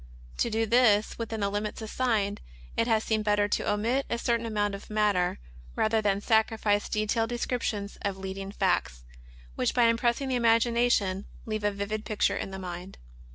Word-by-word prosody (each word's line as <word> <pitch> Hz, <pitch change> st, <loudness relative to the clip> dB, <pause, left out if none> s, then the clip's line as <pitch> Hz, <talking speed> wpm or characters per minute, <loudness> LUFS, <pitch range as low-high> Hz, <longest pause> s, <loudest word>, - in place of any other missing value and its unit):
To 235 Hz, -, +2 dB
do 225 Hz, 0 st, 0 dB
this 220 Hz, -2 st, +3 dB
within 225 Hz, -1 st, -3 dB
the 200 Hz, -, +1 dB
limits 205 Hz, +1 st, -3 dB
assigned, 220 Hz, -3 st, -1 dB, 0.3 s
it 230 Hz, -, +1 dB
has 220 Hz, -2 st, +2 dB
seemed 215 Hz, -1 st, 0 dB
better 205 Hz, -1 st, +2 dB
to -, -, 0 dB
omit 230 Hz, +6 st, 0 dB
a 235 Hz, -, 0 dB
certain 235 Hz, -1 st, 0 dB
amount 205 Hz, -2 st, 0 dB
of 200 Hz, -, -8 dB
matter 210 Hz, -4 st, +1 dB, 0.4 s
rather 220 Hz, 0 st, +2 dB
than 200 Hz, -1 st, +1 dB
sacrifice 220 Hz, -2 st, +2 dB
detailed 215 Hz, +2 st, 0 dB
descriptions 235 Hz, -4 st, -3 dB
of 200 Hz, -2 st, -2 dB
leading 195 Hz, 0 st, -6 dB
facts, -, -, 0 dB, 0.5 s
which -, -, -1 dB
by 245 Hz, -, +4 dB
impressing 235 Hz, +3 st, +2 dB
the 260 Hz, -, -1 dB
imagination 230 Hz, -4 st, +2 dB, 0.2 s
leave 215 Hz, -1 st, -3 dB
a 205 Hz, -, +3 dB
vivid 205 Hz, +1 st, -3 dB
picture 215 Hz, -1 st, +1 dB
in -, -, -4 dB
the 190 Hz, -, -6 dB
mind. 180 Hz, 0 st, -7 dB
215 Hz, 170 wpm, -28 LUFS, 200-230 Hz, 0.5 s, by